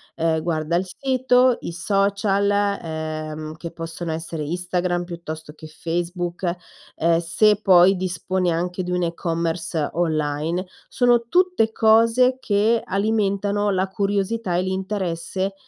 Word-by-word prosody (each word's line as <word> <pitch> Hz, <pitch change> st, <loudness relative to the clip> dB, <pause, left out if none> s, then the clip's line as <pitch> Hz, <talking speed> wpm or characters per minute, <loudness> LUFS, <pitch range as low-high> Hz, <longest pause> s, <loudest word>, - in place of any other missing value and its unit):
ehm, 160 Hz, -1 st, 0 dB
guarda 160 Hz, 0 st, -1 dB
il 185 Hz, +2 st, 0 dB
sito, 255 Hz, +1 st, +2 dB
i -, -, -5 dB
social, 200 Hz, +2 st, +1 dB
ehm, 160 Hz, -6 st, -2 dB
che 170 Hz, 0 st, -6 dB
possono 165 Hz, 0 st, -6 dB
essere 160 Hz, 0 st, -4 dB
Instagram 175 Hz, +2 st, -1 dB
piuttosto 160 Hz, -3 st, -8 dB
che 155 Hz, 0 st, -11 dB
Facebook, 175 Hz, +2 st, -3 dB, 0.4 s
ehm, 165 Hz, 0 st, +2 dB
se 205 Hz, +5 st, +3 dB
poi 185 Hz, 0 st, +6 dB
disponi 180 Hz, 0 st, -1 dB
anche 180 Hz, +2 st, -2 dB
di 180 Hz, -, -5 dB
un 180 Hz, 0 st, 0 dB
e-commerce 165 Hz, -2 st, -2 dB
online, 160 Hz, +1 st, -1 dB, 0.2 s
sono 240 Hz, -1 st, +3 dB
tutte 360 Hz, -10 st, +2 dB
cose 230 Hz, +4 st, +4 dB
che 220 Hz, 0 st, +2 dB
alimentano 205 Hz, 0 st, 0 dB
la 190 Hz, -1 st, +1 dB
curiosità 200 Hz, 0 st, -1 dB
e 180 Hz, -, +1 dB
l'interesse 190 Hz, -1 st, -2 dB
180 Hz, 120 wpm, -22 LUFS, 165-205 Hz, 0.4 s, poi